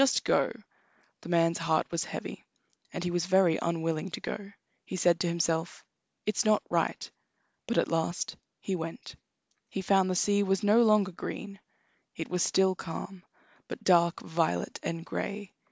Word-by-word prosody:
Just 275 - +4
go!" - - +2 0.7
The - - -10
man's 165 -1 +3
heart 165 -1 +2
was 170 -1 -1
heavy, - - -6 0.5
and 180 - -4
he 175 - -1
was 175 0 0
very 185 -3 +4
unwilling 165 0 -1
to - - -5
go. 200 -1 -6 0.3
He - - -6
said 175 -1 +3
to 175 - +1
himself: 170 0 -1 0.4
"It's 215 -1 +1
not 215 -1 +3
right." - - 0 0.6
But 235 - -1
at - - +3
last 165 +1 -1 0.2
he 195 - -2
went. 165 +7 -6 0.5
He 195 - -4
found 190 0 +3
the 185 - 0
sea 205 +2 +3
was 195 -1 +1
no 210 +3 +6
longer 215 -4 +4
green; 195 +3 -6 0.6
it - - -5
was 180 -1 0
still 190 +1 +3
calm, 185 +2 -7 0.5
but - - -7
dark 170 -2 +4
violet 160 - -1
and 165 0 -4
gray. 200 0 -4
180 Hz, 165 wpm, -29 LUFS, 165-195 Hz, 0.7 s, no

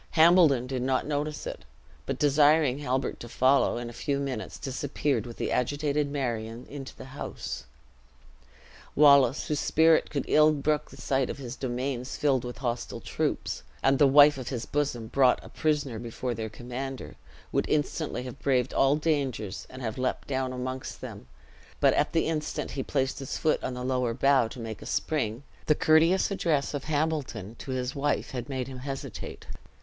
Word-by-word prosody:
Hambledon 160 -6 +6
did 130 -1 -3
not 130 0 +1
notice 150 0 -2
it; - - -6 0.4
but - - -2
desiring 145 -1 +4
Halbert 130 -2 -1
to 120 - -8
follow, 130 +2 +3
in 120 0 -4
a 120 - -8
few 140 +4 -1
minutes 135 -6 -4
disappeared 135 -2 -2
with 120 - -9
the - - -2
agitated 145 +3 0
Marion 120 -4 -3
into 135 -2 -7
the - - -10
house. 135 +2 -6 1.3
Wallace, 140 -3 +6
whose 150 -2 -1
spirit 160 0 +4
could 145 - -2
ill 155 0 +5
brook 150 +1 0
the - - -13
sight 135 -2 0
of - - -4
his 125 -3 -6
domains 125 0 -3
filled 135 -4 +2
with 125 0 -6
hostile 120 -2 -3
troops, - - -2 0.2
and 135 0 +3
the 145 - +7
wife 145 +1 +7
of 130 -1 -5
his 120 -3 -3
bosom 140 -6 -1
brought 130 +2 +3
a - - -11
prisoner 145 -7 -1
before 120 +1 -4
their 110 -1 -4
commander, 125 +4 -6 0.4
would - - 0
instantly 150 -3 -1
have 130 +1 -8
braved 130 -3 +1
all 135 +1 +4
dangers, 140 - -1
and 130 0 -9
have 110 +1 -3
leaped 130 - -1
down 130 -2 -1
amongst 130 +1 -5
them; - - -8 0.5
but - - +5
at - - +1
the 165 - +2
instant 155 -2 -2
he 135 - -3
placed 135 0 -1
his 135 - -4
foot 155 - +1
on 125 - -3
a 125 - -4
lower 125 -2 0
bough 135 -2 +4
to 115 - -10
make 115 -2 -6
a - - -9
spring, 125 -5 -1 0.2
the 150 - +5
courteous 165 +7 +4
address 155 -8 0
of 145 -1 -4
Hambledon 150 -9 -2
to - - -9
his 130 0 -2
wife 145 +1 -1
had 125 0 -5
made 130 -2 -3
him 130 -1 -8
hesitate. 135 +1 -6
135 Hz, 180 wpm, -28 LUFS, 125-145 Hz, 1.3 s, the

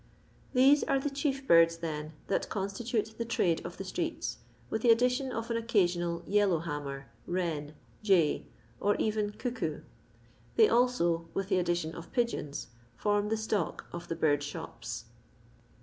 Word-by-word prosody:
These 275 +3 +6
are 275 - +2
the 275 +1 -1
chief 275 -1 -1
birds, 165 0 +6
then, 155 -2 -4
that 200 - -1
constitate 215 +3 -2
the - - +1
trade 190 -8 +1
of - - -7
the - - -4
streets, - - -3 0.3
with 220 - -2
the 240 - +3
addition 250 +3 +3
of 230 0 -3
an 230 - +1
occammal 175 -7 +1
yellow 200 -3 +3
hammer, 145 -4 -4 0.2
wren, 160 -4 -2 0.3
jay, 185 -8 +3 0.3
or 205 0 +2
eyen 215 -1 0
eockoo. 210 - -3 0.7
They 440 - +7
also, 175 - +2
with 195 0 -2
the 190 -2 +3
addition 175 -2 0
of 165 +1 -9
pigeons, 235 - -1 0.3
form 205 - +1
the 220 - +1
stock 215 -5 -1
of 170 0 -6
the 165 - -2
bird 145 -3 +3
thops. 120 -7 -6
195 Hz, 150 wpm, -31 LUFS, 165-230 Hz, 0.7 s, They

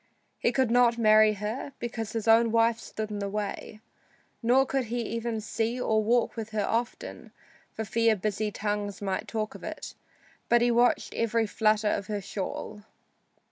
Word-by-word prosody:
He - - +2
could 255 -2 +1
not 240 -1 +4
marry 215 -1 +5
her, 215 +7 -5
because 225 -2 -5
his 225 -1 -3
own 225 0 +5
wife 230 0 +3
stood 215 -1 -6
in 205 - -4
the 200 0 -3
way, 210 +1 -5 0.6
nor 255 +3 +4
could 265 -1 -1
he 235 +1 -2
even 230 0 -3
see 225 +3 -2
or 220 -3 +1
walk 235 +2 +1
with 225 -2 -5
her 210 -2 0
often, 235 +3 -3 0.4
for 220 - -3
fear 230 +1 +2
busy 210 +2 -2
tongues 205 -1 -3
might 195 -2 -3
talk 215 -1 -3
of - - -12
it, - - -6 0.6
but 240 0 +5
he 240 - +3
watched 240 +1 +2
every 230 0 +1
flutter 215 0 +2
of 195 - -2
her 210 -1 -2
shawl. 200 +2 -5
220 Hz, 175 wpm, -28 LUFS, 210-235 Hz, 0.6 s, marry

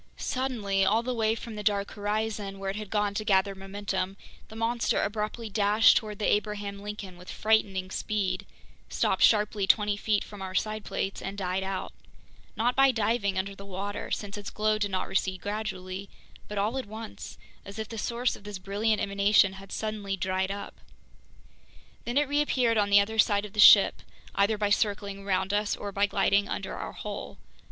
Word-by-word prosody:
Suddenly, 230 -8 -1
all 215 +4 +3
the 250 +1 -2
way 220 -1 +1
from 230 0 -8
the 210 - -5
dark 200 -1 0
horizon 210 -1 -2
where 195 0 -3
it - - -7
had 210 -1 -6
gone 205 -1 0
to 215 - -2
gather 195 -2 +2
momentum, 195 0 -4 0.3
the 220 - -12
monster 230 +1 0
abruptly 215 +2 -3
dashed 210 +1 +5
toward 210 -2 -1
the 210 - -2
Abraham 205 -1 -1
Lincoln 205 -3 -7
with 180 - -12
frightening 195 -4 +1
speed, 205 -2 -2 0.4
stopped - - 0
sharply 210 -2 +4
twenty 210 -1 +3
feet 210 0 0
from 205 -2 -11
our 190 -1 -5
side 215 +2 -1
plates, 195 -1 -3
and 195 +1 -5
died 185 -1 -1
out—not 195 +4 -5
by 270 0 +6
diving 215 -4 0
under 195 +1 -2
the 195 - -11
water, 200 +1 -5
since 205 0 -4
its 200 0 -6
glow 215 0 0
did 205 -1 0
not 185 -1 -2
recede 190 -1 -1
gradually—but 200 -1 -6
all 215 +6 0
at 255 - -6
once, 220 +1 -8 0.3
as 200 +1 -10
if 220 -1 -4
the 225 0 -6
source 240 +3 0
of - - -14
this 205 -1 -6
brilliant 205 +3 0
emanation 200 0 +3
had 195 0 -12
suddenly 210 -3 -3
dried 190 +1 -1
up. 200 +1 -6 1.3
Then 240 +3 -1
it 290 0 +3
reappeared 270 -5 +2
on 205 -1 +2
the 200 0 +7
other 220 +2 -1
side 205 -1 +4
of 200 - -10
the 210 - -6
ship, 205 -1 +8 0.3
either 205 +2 +2
by 205 -1 0
circling 200 -2 0
around 190 0 0
us 205 0 +1
or 205 - -6
by 200 +1 +2
gliding 200 0 +2
under - - -4
our - - -6
hull. - - -6
205 Hz, 185 wpm, -28 LUFS, 195-215 Hz, 1.3 s, ship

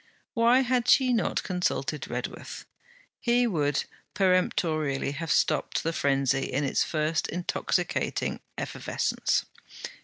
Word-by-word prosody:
Why 235 +2 +4
had 250 -1 +1
she 255 -1 +5
not 230 - 0
consulted 180 -2 -2
Redworth? - - -6 0.5
He 240 0 +3
would 150 - +1 0.3
peremptorily 160 -7 +1
have 155 +1 -4
stopped 140 - +1
the 165 - -1
frenzy 135 -2 +1
in 140 +3 0
its 135 - +1
first 155 0 0
intoxicating 175 +1 -1 0.2
effervescence. - - -1
165 Hz, 110 wpm, -27 LUFS, 145-230 Hz, 0.5 s, she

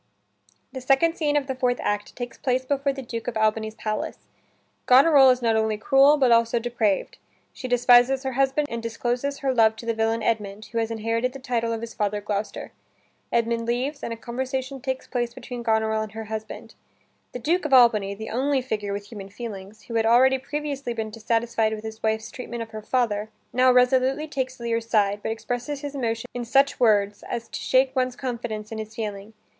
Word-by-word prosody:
The 260 - -6
second 275 +6 +3
scene 295 -2 +1
of 285 - 0
the 265 - -3
fourth 250 -1 0
act 205 0 -2
takes 245 -1 -6
place 260 0 -1
before 275 +1 0
the 270 -1 -7
Duke 230 -1 -6
of 235 -2 -2
Albany's 220 0 0
palace. 215 -1 -3 0.7
Goneril 270 +1 +7
is 250 -1 +2
not 225 -1 +3
only 220 -1 +1
cruel, 275 +6 +5
but 260 -4 +3
also 230 0 +4
depraved. 230 -4 -1 0.3
She 255 - -6
despises 245 +2 +5
her 265 - -2
husband 270 +3 +1
and 230 0 -3
discloses 245 +4 -2
her 265 - +2
love 220 -2 +4
to 225 - -10
the 230 - 0
villain 225 0 0
Edmund, 210 -2 -2
who 230 - -1
has 225 0 -1
inherited 230 +2 -1
the - - -7
title 235 -3 -1
of 225 -1 -3
his 230 0 -7
father 210 0 -1
Gloucester. 205 0 -4 0.6
Edmund 230 0 0
leaves, 260 +5 -1
and - - -4
a 230 - -4
conversation 260 +3 -4
takes 260 0 -3
place 240 -2 -3
between 245 -2 -7
Goneril 220 -1 +1
and 215 -1 -6
her 225 0 -5
husband. 220 +1 -7 0.6
The - - -5
Duke 330 +9 0
of 300 - -2
Albany, 220 -6 +5
the 220 +2 -7
only 265 +3 +1
figure 210 -5 -3
with 205 0 -6
human 200 -3 -8
feelings, 205 -1 -8
who 235 - -9
had 225 -1 +2
already 260 +3 +5
previously 280 -2 -4
been 220 -1 -4
dissatisfied 225 0 0
with 215 - -9
his 220 0 -7
wife's 220 0 -1
treatment 240 -2 -6
of 225 - -13
her 215 -1 -7
father, 215 -3 0 0.2
now 255 +1 +5
resolutely 260 +4 +3
takes 260 -3 -4
Lear's 230 -1 -2
side, 205 -2 +2
but - - -2
expresses 245 +6 -4
his 290 -1 -5
emotion 230 -4 -2
in 245 - -4
such 275 +4 +3
words 205 -3 +2
as 235 -1 -4
to - - -5
shake 260 +1 +2
one's 255 -1 0
confidence 235 -5 -5
in 220 - -5
his 220 0 -7
feeling. 210 -1 -5
235 Hz, 200 wpm, -24 LUFS, 220-260 Hz, 0.7 s, Goneril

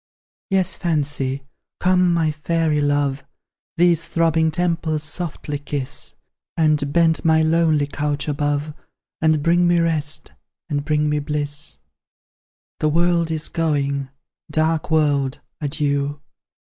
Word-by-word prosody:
Yes, 190 -2 +2
Fancy, 145 -5 -1 0.4
come, 180 -1 +3
my 165 -2 +2
Fairy 155 0 0
love! 145 -1 0 0.5
These 170 -1 +3
throbbing 165 -1 +2
temples 165 -2 -1
softly 155 -2 -2
kiss; 145 -2 -4 0.4
And 150 -3 +2
bend 160 -1 +3
my 160 -1 +4
lonely 160 -2 +3
couch 145 0 -2
above, 145 +1 -1 0.5
And 155 -2 +3
bring 175 +2 +3
me 175 0 +3
rest, 155 -3 0 0.4
and 145 -2 -1
bring 150 0 +1
me 150 0 +1
bliss. 145 0 -3 1.0
The 155 - +2
world 170 +1 +2
is 160 -1 -2
going; 140 -4 -1 0.4
dark 160 0 0
world, 145 -4 +1 0.2
adieu! 145 -1 -1
155 Hz, 115 wpm, -21 LUFS, 145-165 Hz, 1.0 s, my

